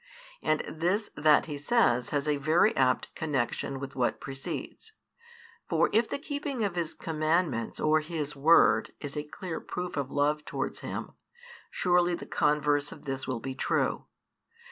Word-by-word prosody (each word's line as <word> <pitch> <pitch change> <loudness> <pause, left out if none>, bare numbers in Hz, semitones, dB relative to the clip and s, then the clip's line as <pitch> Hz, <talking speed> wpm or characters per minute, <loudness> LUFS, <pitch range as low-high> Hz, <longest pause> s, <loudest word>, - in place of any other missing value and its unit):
And 155 - +1
this 180 +7 -1
that 150 0 +4
He 145 -2 -5
says 145 - +2
has 145 0 -1
a 150 -1 +2
very 160 +10 +3
apt 130 -1 +1
connexion 135 -3 -2
with 140 0 -7
what 125 -2 0
precedes. 135 - -6 0.8
For, - - +2
if 225 +1 +3
the - - -2
keeping 285 -4 -3
of 200 -3 0
His 170 -2 -2
commandments 155 -6 0
or 155 0 +3
His 155 -2 -4
Word 155 +4 +5
is 145 -1 -6
a 150 - -1
clear 165 +3 -6
proof 180 0 -5
of 140 -2 -1
love 150 +2 +1
towards - - -4
Him, - - -5 0.6
surely 175 -1 +2
the - - -8
converse 145 -1 +1
of - - -12
this 135 -1 -3
will 130 -3 -2
be 130 +3 -5
true. - - 0
150 Hz, 160 wpm, -29 LUFS, 140-175 Hz, 0.8 s, Word